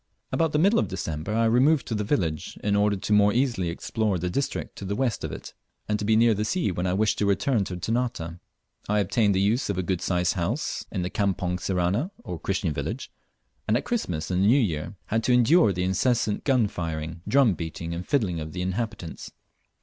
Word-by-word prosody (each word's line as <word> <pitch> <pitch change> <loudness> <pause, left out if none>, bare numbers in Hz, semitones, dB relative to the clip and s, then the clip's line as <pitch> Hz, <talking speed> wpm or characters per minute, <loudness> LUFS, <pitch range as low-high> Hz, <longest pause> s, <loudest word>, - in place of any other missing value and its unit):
About 165 -2 +1
the 150 - +1
middle 200 +8 +4
of - - 0
December 80 -2 -4
I 115 0 +3
removed 130 +6 +4
to - - -4
the 105 -1 -1
village, 85 - -1
in 100 -1 +2
order 100 0 +2 0.2
more 105 0 +5
easily 120 -8 +1
to - - -1
explore 110 +1 -1
the 90 +1 -2
district 140 +8 -3
to 100 - -6
the 100 +2 -2
west 125 -2 -1
of - - -3
it, - - -8 0.3
and 105 0 0
to 105 - -2
be 110 +1 +3
near 115 +1 +5
the 105 +1 -1
sea 165 - 0
when 90 +1 -2
I 90 - +1
wished 105 +1 +1
to 105 - +2
return 100 +2 +1
to 90 - -5
Ternate. 115 +5 -1 0.7
I 105 - +2
obtained 100 +1 +2
the - - +2
use 105 +6 +1
of 100 - -1
a 95 - 0
good 90 0 -1
sized 90 -1 +1
house 100 - -2
in 95 -4 -2
the 90 - -3
Campong 90 -3 -1
Sirani 95 - 0
(or - - -6
Christian - - -1
village), - - -4 0.6
and - - +3
at - - -4
Christmas 90 - -2
and 90 +1 +1
the - - +4
New 130 +6 +5
Year 85 - -2
had 110 +1 -1
to 125 - +3
endure 125 - +5
the 90 -1 -2
incessant 105 +3 +1
gun 130 -6 +3
firing, 80 -2 -5
drum 135 -6 +4
beating, 85 +1 -5
and 85 +1 -4
fiddling 100 - +1
of 80 0 -6
the 90 0 -3
inhabitants. 95 -2 -4
100 Hz, 220 wpm, -26 LUFS, 90-120 Hz, 0.7 s, more